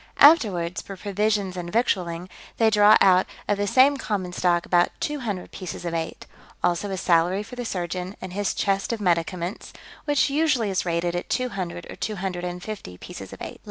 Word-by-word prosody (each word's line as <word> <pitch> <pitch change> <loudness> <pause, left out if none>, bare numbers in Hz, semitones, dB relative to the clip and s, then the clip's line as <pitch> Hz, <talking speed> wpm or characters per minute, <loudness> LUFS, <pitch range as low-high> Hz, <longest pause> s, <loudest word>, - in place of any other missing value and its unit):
Afterwards, 200 - +5
for 195 - -9
provisions 200 -1 0
and 175 -1 -5
victualling, 180 -6 0 0.3
they 225 -1 +4
draw 210 0 +7
out 185 -1 +5 0.2
of 205 -1 +1
the 205 - 0
same 265 +6 +5
common 190 -8 -3
stock 175 -1 +1
about 175 -1 +3
two 295 0 -2
hundred 205 -8 -4
pieces 180 -1 -7
of 170 - -2
eight; 165 -1 -4 0.4
also 175 +3 +1
a 190 - -3
salary 180 +2 +2
for 250 - -10
the 245 -1 -5
surgeon, 180 -1 -3
and 185 -1 -7
his 205 +1 -1
chest 195 +1 0
of 230 - -2
medicaments, 175 0 -1 0.3
which 290 -1 +3
usually 275 -8 +2
is 185 -1 -1
rated 170 +1 0
at 175 - -4
two 255 -1 0
hundred 175 -4 -5
or - - -8
two 215 - -3
hundred 180 -2 -4
and 180 0 -5
fifty 200 - -7
pieces - - -9
of - - -9
eight. - - -7
190 Hz, 195 wpm, -24 LUFS, 175-215 Hz, 0.4 s, draw